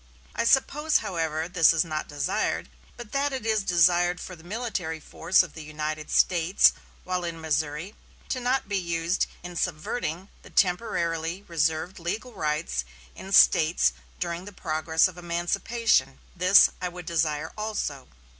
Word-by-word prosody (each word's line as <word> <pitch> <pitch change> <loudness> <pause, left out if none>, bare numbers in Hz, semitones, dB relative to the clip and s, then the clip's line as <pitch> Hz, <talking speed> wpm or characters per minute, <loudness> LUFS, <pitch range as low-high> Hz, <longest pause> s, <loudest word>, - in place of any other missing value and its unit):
I - - -1
suppose, 295 +5 +3
however, 160 -2 -2
this 175 -3 +5
is 165 +1 +2
not 155 -2 -4
desired, 145 +6 -2 0.3
but 240 -3 -10
that 280 +1 0
it 260 -4 -4
is 220 -2 +2
desired 175 -1 +3
for 185 - -8
the 160 - -17
military 190 -5 -4
force 170 +4 +2
of 170 - -10
the 160 - -9
United 155 0 -5
States, 175 +2 +4 0.3
while 185 -1 -2
in 170 -1 -4
Missouri, 155 +4 -2 0.4
to 255 - -1
not 250 0 0
be 200 -1 0
used 170 0 -1 0.2
in 175 0 -8
subverting 175 +2 -3
the - - -15
temporarily 175 -2 0
reserved 165 +1 -1
legal 215 +9 -4
rights 150 - -2 0.3
in 190 - -10
slaves 165 -3 +5 0.3
during 170 +1 -3
the 205 - -9
progress 160 -2 +1
of 180 -1 -10
emancipation. 175 +7 0 0.2
This 185 +3 +6
I 180 - -1
would 175 -1 -10
desire 160 -2 -1
also." 210 -11 -4
175 Hz, 150 wpm, -26 LUFS, 160-195 Hz, 0.4 s, This